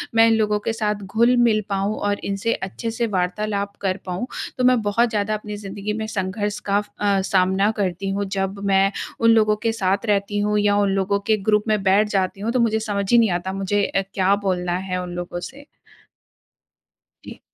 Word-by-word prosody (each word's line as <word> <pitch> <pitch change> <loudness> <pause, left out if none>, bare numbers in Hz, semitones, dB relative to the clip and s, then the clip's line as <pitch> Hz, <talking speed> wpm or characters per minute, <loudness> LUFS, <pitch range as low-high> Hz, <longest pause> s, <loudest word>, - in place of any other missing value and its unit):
मैं 225 0 +6
इन 225 - +4
लोगों 210 -1 +1
के 225 - 0
साथ 210 -2 -1
घुल-मिल 235 +1 +3
पाऊँ 200 +2 -1
और 205 0 -1
इनसे 200 +4 -1
अच्छे 195 +4 -5
से 230 +1 -1
वार्तालाप 200 +2 -1
कर 190 -1 0
पाऊँ। 185 +6 -3 0.3
तो 255 - 0
मैं 250 -2 +4
बहुत 220 +3 +2
ज़्यादा 215 -1 -1
अपनी 210 0 -5
ज़िंदगी 205 +1 -5
में 220 0 -3
संघर्ष 205 0 -2
का 200 - +3 0.2
अ, 200 -2 +2
सामना 190 +1 +2
करती 195 0 -2
हूँ, 200 +1 -1
जब 195 0 -3
मैं 195 0 +3 0.3
उन 230 0 +5
लोगों 215 -2 +4
के 230 - +2
साथ 200 -1 0
रहती 205 -1 0
हूँ 210 +1 +1
या 205 0 +3
उन 205 -1 +2
लोगों 195 +1 +1
के 220 - +3
ग्रुप 210 0 +2
में 215 -2 +1
बैठ 200 +2 +4
जाती 195 -1 -1
हूँ 225 +3 -1
तो 255 - +1
मुझे 220 -2 +2
समझ 200 -3 -2
ही 240 - +6
नहीं 230 -2 +4
आता 180 +2 -2
मुझे 195 +1 0
अ, 195 - 0
क्या 195 +1 +3
बोलना 180 -3 -1
है 185 0 -1
उन 180 -1 -6
लोगों 175 0 -5
से। 275 +10 -10 1.6
जी। - - -10
205 Hz, 200 wpm, -22 LUFS, 195-215 Hz, 1.6 s, मैं